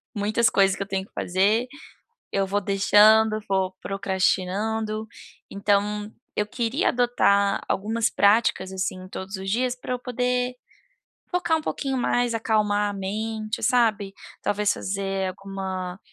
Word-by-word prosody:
Muitas 215 +2 +2
coisas 195 -1 +3
que 200 - -4
eu - - -4
tenho 190 -1 -2
que - - -33
fazer, 200 +6 +1 0.7
eu 195 -1 0
vou 205 +2 0
deixando, 215 +2 +5
vou 190 -1 0
procrastinando. 200 +3 -1 0.4
Então 205 +1 0 0.2
eu 210 - 0
queria 240 - -1
adotar 200 -5 +2
algumas 225 +3 0
práticas, 200 -3 +2
assim, 185 -1 -4
todos 190 +1 -6
os 190 0 -5
dias, 250 +3 0
para 250 0 -7
eu 250 - -3
poder 250 0 -1 0.8
focar 350 -2 +1
um - - -5
pouquinho 275 -3 -2
mais, 245 -1 +1
acalmar 210 -2 +1
a - - -4
mente, 215 +3 -4
sabe, 225 -6 +2 0.3
talvez 210 0 +1
fazer 195 -1 -2
alguma 190 -1 -5
210 Hz, 135 wpm, -24 LUFS, 195-225 Hz, 0.8 s, deixando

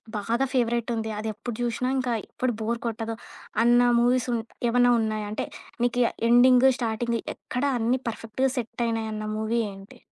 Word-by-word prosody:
బాగా 230 +5 0
ఫేవరటుంది. 235 -2 0
అదెప్పుడు 220 +2 -5
జూశినా 240 +1 -1
ఇంకా 255 -2 0
ఎప్పుడు 255 -1 -2
బోర్ 230 +2 -1
కొట్టదు, 225 0 -3 0.5
అన్న 240 +1 +5 0.2
మూవీస్ 245 +1 +2
ఉన్ 230 - 0 0.3
ఏవన్నా 245 +1 +4
ఉన్నాయా? 215 -1 -1
అంటే 215 - -2 0.4
నీకు 245 0 +2 0.3
ఎండింగ్, 250 +2 +6
స్టార్టింగ్ 235 0 -1 0.2
ఎక్కడ 250 - -4 0.2
అన్ని 240 +3 +1
పర్ఫెక్ట్‌గా 230 +4 -1
సెటయినాయన్న 225 -2 -2
మూవీ 220 +2 0
ఏంటి? 195 +1 -14
235 Hz, 135 wpm, -26 LUFS, 220-245 Hz, 0.5 s, ఎండింగ్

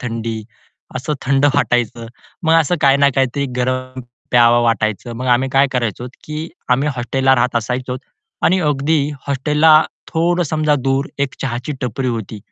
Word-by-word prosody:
थंडी, 115 -3 -4 0.5
असं 150 - -3
थंड 135 +1 +2
वाटायचं. 120 -4 0 0.4
मग 160 0 +4
असं 160 +4 0
काही 140 0 +5
ना 140 0 +4
काहीतरी 135 +1 0
गरम 130 +1 -2 0.3
प्यावं 120 -1 +5
वाटायचं. 115 0 -1
मग 130 +2 -4
आम्ही 125 +1 +2
काय 135 +1 +4
करायचो 120 0 -2
की 155 +2 -5 0.2
आम्ही 135 +4 +2
हॉस्टेलला 135 +2 +2
राहत 125 0 +1
असायचो 125 0 -3 0.4
आणि 185 +3 +3
अगदी 150 0 +1 0.2
हॉस्टेलला 150 +3 +4 0.3
थोडं 175 +2 +1
समजा 155 -1 +1
दूर 135 +2 0
एक 140 -1 -1
चहाची 125 +2 -3
टपरी 125 +1 -2
होती. 110 -2 -4
130 Hz, 150 wpm, -18 LUFS, 120-145 Hz, 0.5 s, काही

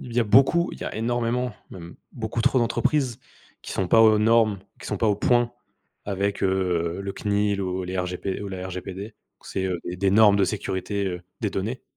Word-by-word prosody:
il 125 - -9
y 120 - +3
a - - +2
beaucoup 135 - +4
il - - -10
y - - -4
a - - -5
énormément, 120 +2 -1 0.2
même 85 -2 -10 0.2
beaucoup 115 0 -3
trop 130 - +3
d'entreprises 120 +2 0 0.4
qui - - -7
sont 95 - -1
pas 115 - +6
aux 110 -1 +6
normes, 110 -2 +3 0.2
qui - - -9
sont - - -2
pas 115 - +2
au 105 - +2
point 120 +2 +2 0.5
avec, 100 0 -2
heu, 90 -2 0
le 100 0 -4
CNIL 100 0 0
ou 95 -1 -2
les 90 +1 -4
RGP 90 +1 -3
ou 100 - -5
la 95 -1 -5
RGPD 95 +3 -7 0.3
c'est, 95 - -3
heu, 90 -2 -2
des 95 +2 0
normes 105 0 +6
de 100 - +3
sécurité, 100 +1 -2
heu, 90 -1 -4 0.2
des 105 -4 -1
données. 110 +7 -3
100 Hz, 205 wpm, -24 LUFS, 95-115 Hz, 0.5 s, pas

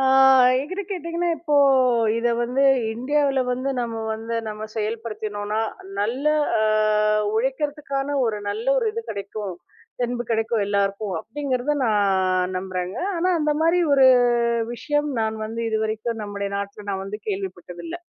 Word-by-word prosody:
ஆ - - +2 0.6
என்கிட்ட 370 +9 -4
கேட்டீங்கன்னா, 345 -1 -2
இப்போ 295 -2 0 0.6
இத 240 +1 +1
வந்து 250 +3 +1 0.3
இந்தியாவில 275 +2 +1
வந்து, 255 +2 -2
நாம 230 -2 -3
வந்து 225 +1 -4
நாம 215 0 -5
செயல்படுத்தினோன்னா, 215 -1 -3 0.4
நல்லா 265 +9 +1 0.3
அ - - +2 0.7
உழைக்கறதுக்கான 275 +2 -1
ஒரு 215 -2 -1
நல்ல 445 - -3
ஒரு 465 - 0
இது 460 +1 -4
கெடைக்கும், 200 -1 -5 0.5
தென்பு 240 0 -2
கெடைக்கும் 225 -1 +1
எல்லாருக்கும் 200 0 -1
அப்படிங்கறத 275 +2 -2
நான் 190 -3 +1
நம்புறங்க. 185 0 -4 0.2
ஆனா, 345 +2 +1
அந்த 300 0 +1
மாரி 335 +2 +3
ஒரு 270 -1 +6 0.7
விஷயம் 295 +4 -1
நான் 220 0 -1
வந்து, 225 +1 -5
இதுவரைக்கும் 220 +1 -2
நம்முடைய 200 -1 -4
நாட்டுல 200 +1 -7
நான் 190 -1 -3
வந்து 205 +2 -6
கேள்விப்பட்டதில்ல. 195 - -5
225 Hz, 130 wpm, -23 LUFS, 205-280 Hz, 0.7 s, ஒரு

